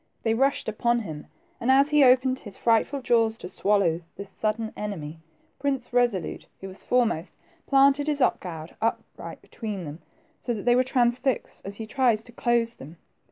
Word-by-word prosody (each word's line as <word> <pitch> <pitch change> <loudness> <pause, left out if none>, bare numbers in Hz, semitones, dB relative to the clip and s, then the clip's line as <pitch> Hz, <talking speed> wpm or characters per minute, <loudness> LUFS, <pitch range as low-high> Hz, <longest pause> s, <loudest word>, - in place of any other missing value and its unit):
They 225 - +2
rushed 270 +4 +1
upon 235 +2 +1
him, 155 -8 -8 0.3
and 240 - -2
as 275 +2 +5
he 295 -1 +5
opened 255 0 +4
his 205 -3 -10
frightful 240 +4 +1
jaws 225 -2 +2
to 180 - -7
swallow 190 -3 +1 0.2
this 200 -1 -7
sudden 220 +2 -2
enemy. 165 -7 -6 0.4
Prince 270 -4 -2
Resolute, 240 -7 0
who 195 - -7
was 190 0 -12
foremost, 230 -9 0 0.3
j)lanted 275 +1 +4
his 295 -1 0
ox 255 - +2
goad 165 -3 -8
up 230 - 0
right - - -9
between 210 -5 -6
them, 155 +1 -8 0.4
so 240 - -2
that 210 - -7
they 240 0 +5
were 250 - +5
transfixed 250 -1 0
as 200 +1 -6
he 220 - -6
tried 240 0 +2
to 225 +3 -10
close 235 -1 +1
them. 160 - -12
230 Hz, 180 wpm, -26 LUFS, 200-255 Hz, 0.4 s, as